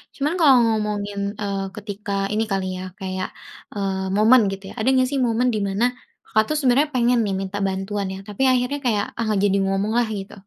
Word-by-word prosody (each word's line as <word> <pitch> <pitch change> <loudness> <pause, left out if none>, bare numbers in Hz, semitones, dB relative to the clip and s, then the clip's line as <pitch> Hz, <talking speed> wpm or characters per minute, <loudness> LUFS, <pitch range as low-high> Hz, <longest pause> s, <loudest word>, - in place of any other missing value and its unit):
Cuman 290 +3 -1
kalau 290 -5 +7
ngomongin, 210 -2 -1 0.2
eee, 200 -1 -2
ketika 205 -1 -6 0.2
ini 220 +1 +1
kali 195 -1 0
ya - - -5 0.2
kayak, 185 -1 -3 0.5
eee, 190 -1 -2
momen 225 +4 +6
gitu 195 0 -7
ya, - - -10
ada 220 - -1
nggak 255 0 +3
sih 280 - 0
momen 235 +2 +1
di - - 0
mana 200 +4 +1 0.4
Kakak 215 0 +2
tuh 305 - 0
sebenarnya 280 +1 +3
pengen 245 0 +3
nih 200 - -1
minta 195 +1 -4
bantuan 195 +1 -3
ya 190 - -7
tapi 210 +3 -6
akhirnya 255 +3 0
kayak, 210 -4 +1
ah 230 - -1
gak 205 - +1
jadi 200 -1 +2
ngomonglah 210 +5 +1
gitu? 195 - -9
210 Hz, 200 wpm, -22 LUFS, 195-245 Hz, 0.5 s, kalau